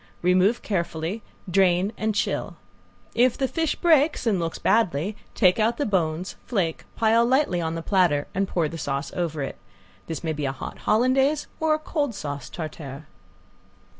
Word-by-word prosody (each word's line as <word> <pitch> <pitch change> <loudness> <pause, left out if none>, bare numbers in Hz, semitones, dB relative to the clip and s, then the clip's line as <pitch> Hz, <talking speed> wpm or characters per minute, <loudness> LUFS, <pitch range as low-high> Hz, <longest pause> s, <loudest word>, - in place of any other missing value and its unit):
Remove 185 +6 +3
carefully, 170 +1 -2 0.3
drain, 185 +2 +3
and 220 -1 -1
chill. - - -1 0.6
If 245 +1 +3
the 270 - +1
fish 325 +3 -1
breaks 315 -5 +3
and 210 -5 +2
looks 165 -1 -2
badly 200 -3 +1 0.2
take 185 -1 +4
out 230 +2 +2
the 290 - 0
bones, 175 -3 -1
flake, 185 -9 -1
pile 225 +1 +4
lightly 240 -8 +2
on 160 0 -2
the 165 - -4
platter 175 -8 +2
and 195 +1 0
pour 170 -4 0
the 165 +2 -7
sauce 140 -1 -3
over 160 -5 -2
it. 135 - -6 0.5
This 165 0 -5
may 160 -1 -1
be 150 -1 -3
a 135 - 0
hot 135 - -7
sauce - - -17
Hollandaise 265 +6 +3
or 315 -1 +3
a - - -1
cold 295 -5 -2
sauce 145 -5 -5
tartare. 155 -3 -7
185 Hz, 170 wpm, -25 LUFS, 160-235 Hz, 0.6 s, take